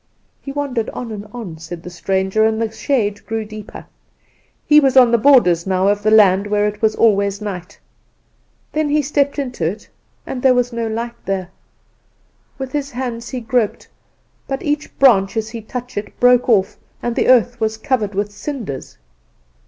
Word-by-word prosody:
"He 275 Hz, -, -7 dB
wandered 275 Hz, -5 st, -2 dB
on 240 Hz, -2 st, -6 dB
and 210 Hz, -1 st, -7 dB
on," 205 Hz, -10 st, -8 dB
said 165 Hz, +1 st, -8 dB
the 180 Hz, -, -8 dB
stranger, 190 Hz, +4 st, 0 dB
"and 220 Hz, 0 st, +2 dB
the 225 Hz, -1 st, -1 dB
shade 220 Hz, -3 st, -1 dB
grew 225 Hz, -1 st, -3 dB
deeper. 215 Hz, -1 st, -10 dB, 0.8 s
He 300 Hz, 0 st, +7 dB
was 270 Hz, -2 st, +2 dB
on 250 Hz, -2 st, +7 dB
the 235 Hz, -, +4 dB
borders 210 Hz, -10 st, +4 dB
now 190 Hz, 0 st, +1 dB
of 205 Hz, 0 st, +1 dB
the 215 Hz, -, +2 dB
land 200 Hz, -2 st, +5 dB
where 210 Hz, 0 st, +1 dB
it 210 Hz, +1 st, -6 dB
is 220 Hz, -, +3 dB
always 200 Hz, -3 st, +2 dB
night. 200 Hz, -2 st, -6 dB, 0.9 s
Then 305 Hz, -1 st, 0 dB
he 300 Hz, 0 st, +2 dB
stepped 280 Hz, 0 st, 0 dB
into 250 Hz, -, -3 dB
it, 175 Hz, +7 st, -3 dB, 0.4 s
and 250 Hz, -, -5 dB
there 260 Hz, -1 st, +4 dB
was 245 Hz, 0 st, 0 dB
no 230 Hz, -1 st, -2 dB
light 235 Hz, +2 st, -5 dB
there. 190 Hz, -2 st, -2 dB, 1.1 s
With 265 Hz, -1 st, -5 dB
his 290 Hz, -2 st, -2 dB
hands 240 Hz, -2 st, -5 dB
he 255 Hz, -2 st, -4 dB
groped; 230 Hz, -2 st, -1 dB, 0.6 s
but 270 Hz, -1 st, -3 dB
each 295 Hz, 0 st, -3 dB
branch 200 Hz, -7 st, +4 dB
as 220 Hz, 0 st, -2 dB
he 230 Hz, -1 st, -6 dB
touched 245 Hz, +2 st, -7 dB
it 205 Hz, -, -11 dB
broke 245 Hz, 0 st, +4 dB
off, 195 Hz, -4 st, +2 dB, 0.3 s
and 240 Hz, -1 st, -2 dB
the -, -, +1 dB
earth 245 Hz, -1 st, +4 dB
was 220 Hz, -1 st, -1 dB
covered 220 Hz, -5 st, -1 dB
with 205 Hz, +1 st, -1 dB
cinders. 205 Hz, -, -6 dB
225 Hz, 180 wpm, -18 LUFS, 205-250 Hz, 1.1 s, He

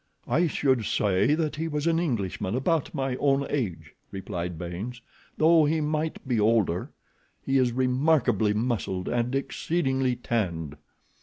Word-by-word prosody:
"I 170 Hz, +3 st, +2 dB
should 130 Hz, -6 st, +1 dB
say 100 Hz, +10 st, +2 dB, 0.2 s
he 160 Hz, +2 st, -2 dB
was 150 Hz, -1 st, -2 dB
an 165 Hz, -1 st, +2 dB
Englishman, 110 Hz, -, -2 dB
about 155 Hz, +3 st, 0 dB
my 135 Hz, -1 st, -1 dB
own 140 Hz, 0 st, +2 dB
age," 85 Hz, -, -3 dB, 0.2 s
replied 90 Hz, -3 st, -5 dB
Baynes; 90 Hz, +9 st, -6 dB, 0.4 s
"though 160 Hz, 0 st, +5 dB
he 160 Hz, +2 st, +1 dB
might 155 Hz, -1 st, -2 dB
be 120 Hz, -4 st, +1 dB
older. 105 Hz, -5 st, +2 dB, 0.6 s
He 135 Hz, 0 st, +2 dB
is 125 Hz, -2 st, +2 dB
remarkably 130 Hz, -2 st, +2 dB
muscled, 105 Hz, -5 st, -2 dB
and 120 Hz, +2 st, 0 dB
exceedingly 135 Hz, -1 st, 0 dB
tanned." 85 Hz, -, -2 dB
125 Hz, 135 wpm, -26 LUFS, 105-145 Hz, 0.6 s, though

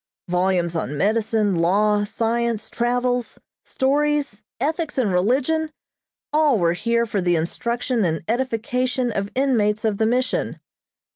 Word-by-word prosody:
Volumes 180 Hz, -1 st, +1 dB
on 150 Hz, -3 st, -2 dB
medicine, 215 Hz, +1 st, +1 dB
law, 205 Hz, +5 st, +2 dB
science, 230 Hz, +1 st, -1 dB
travels, 245 Hz, 0 st, -1 dB, 0.3 s
stories, 285 Hz, -4 st, 0 dB, 0.2 s
ethics 310 Hz, +3 st, -2 dB
and 230 Hz, -7 st, +1 dB
religion 270 Hz, -, +1 dB, 0.6 s
all 300 Hz, -5 st, +4 dB
were 170 Hz, -3 st, +2 dB
here 235 Hz, +5 st, 0 dB
for 205 Hz, -3 st, -2 dB
the 175 Hz, -1 st, +2 dB
instruction 235 Hz, -, -1 dB
and 160 Hz, -2 st, -1 dB
edification 250 Hz, +1 st, -1 dB
of 200 Hz, -1 st, -2 dB
inmates 225 Hz, -6 st, +1 dB
of 210 Hz, -2 st, 0 dB
the 220 Hz, -, +3 dB
Mission. 250 Hz, +2 st, -1 dB
230 Hz, 125 wpm, -22 LUFS, 200-255 Hz, 0.6 s, all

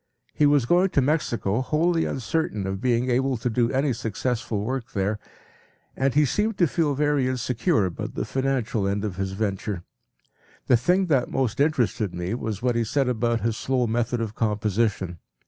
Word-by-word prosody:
He 150 Hz, -, +4 dB
was 145 Hz, -4 st, +3 dB
going 180 Hz, +8 st, +3 dB
to -, -, +8 dB
Mexico 125 Hz, -7 st, 0 dB
wholly 165 Hz, +5 st, +1 dB
uncertain 125 Hz, -5 st, -2 dB
of 95 Hz, +1 st, -3 dB
being 125 Hz, 0 st, +1 dB
able 130 Hz, +1 st, +1 dB
to 120 Hz, +2 st, -2 dB
do 115 Hz, +1 st, +2 dB
any 135 Hz, 0 st, +1 dB
successful 115 Hz, -1 st, -2 dB
work 130 Hz, +1 st, -4 dB
there, 105 Hz, +1 st, -1 dB, 0.8 s
and 135 Hz, 0 st, 0 dB
he 150 Hz, 0 st, +5 dB
seemed 210 Hz, -, 0 dB
to 175 Hz, -, +4 dB
feel 150 Hz, -2 st, 0 dB
very 145 Hz, -2 st, +2 dB
insecure 130 Hz, -, +1 dB
about 90 Hz, -, -5 dB
the -, -, -2 dB
financial 130 Hz, -6 st, -1 dB
end 100 Hz, +2 st, -1 dB
of 95 Hz, -3 st, -4 dB
his 95 Hz, -1 st, -2 dB
venture. 100 Hz, -2 st, -2 dB, 0.8 s
The 125 Hz, -, +5 dB
thing 180 Hz, +11 st, +2 dB
that 135 Hz, -8 st, +1 dB
most 130 Hz, -3 st, -1 dB
interested 120 Hz, -, +1 dB
me 90 Hz, +3 st, -3 dB
was 110 Hz, -3 st, -4 dB
what 125 Hz, -2 st, +2 dB
he 115 Hz, -, +2 dB
said 135 Hz, +4 st, 0 dB
about 115 Hz, -1 st, 0 dB
his 115 Hz, -1 st, -1 dB
slow 130 Hz, -2 st, 0 dB
method 120 Hz, +1 st, 0 dB
of 110 Hz, -2 st, -3 dB
composition. 105 Hz, -4 st, -1 dB
120 Hz, 180 wpm, -25 LUFS, 105-135 Hz, 0.8 s, to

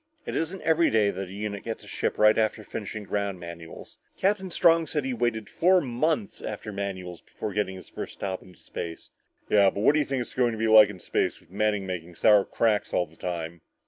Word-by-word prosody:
"It -, -, -4 dB
isn't 170 Hz, +4 st, -2 dB
every 165 Hz, +1 st, +4 dB
day 105 Hz, -2 st, +3 dB
that 95 Hz, 0 st, -5 dB
a -, -, -11 dB
unit 100 Hz, 0 st, -4 dB
gets 115 Hz, -1 st, -5 dB
a -, -, -14 dB
ship -, -, -2 dB
right 105 Hz, 0 st, +6 dB
after 110 Hz, 0 st, 0 dB
finishing 105 Hz, 0 st, -6 dB
ground 100 Hz, -2 st, -2 dB
manuals. 85 Hz, -1 st, -10 dB, 0.2 s
Captain 190 Hz, -1 st, +1 dB
Strong 165 Hz, -2 st, +4 dB
said 150 Hz, -3 st, -2 dB
he 135 Hz, -, -1 dB
waited 115 Hz, -3 st, -1 dB
for -, -, -18 dB
four 180 Hz, +2 st, +5 dB
months 155 Hz, -, -1 dB
after 105 Hz, 0 st, -6 dB
manuals 95 Hz, -3 st, -5 dB
before 105 Hz, -, -6 dB
getting 100 Hz, -2 st, -1 dB
his 95 Hz, -, -11 dB
first -, -, -8 dB
hop 95 Hz, -2 st, -3 dB
into 90 Hz, -1 st, -17 dB
space." 85 Hz, -1 st, -7 dB, 0.4 s
"Yeah 100 Hz, -2 st, +5 dB
but 100 Hz, -, -4 dB
what -, -, +6 dB
do 155 Hz, -, +3 dB
you 150 Hz, -, +1 dB
think 135 Hz, -1 st, -1 dB
it's 120 Hz, -, -6 dB
going 120 Hz, -2 st, +2 dB
to -, -, -5 dB
be 110 Hz, +1 st, 0 dB
like 110 Hz, -1 st, +8 dB
out 105 Hz, -, -7 dB
in 95 Hz, -, -12 dB
space -, -, -1 dB
with 85 Hz, -, -25 dB
Manning 105 Hz, 0 st, 0 dB
making 90 Hz, -2 st, -6 dB
sour 105 Hz, +2 st, +5 dB
cracks 110 Hz, -3 st, 0 dB
all 90 Hz, -, +2 dB
the 80 Hz, -, -21 dB
time?" 85 Hz, -2 st, -5 dB
105 Hz, 235 wpm, -27 LUFS, 95-125 Hz, 0.4 s, like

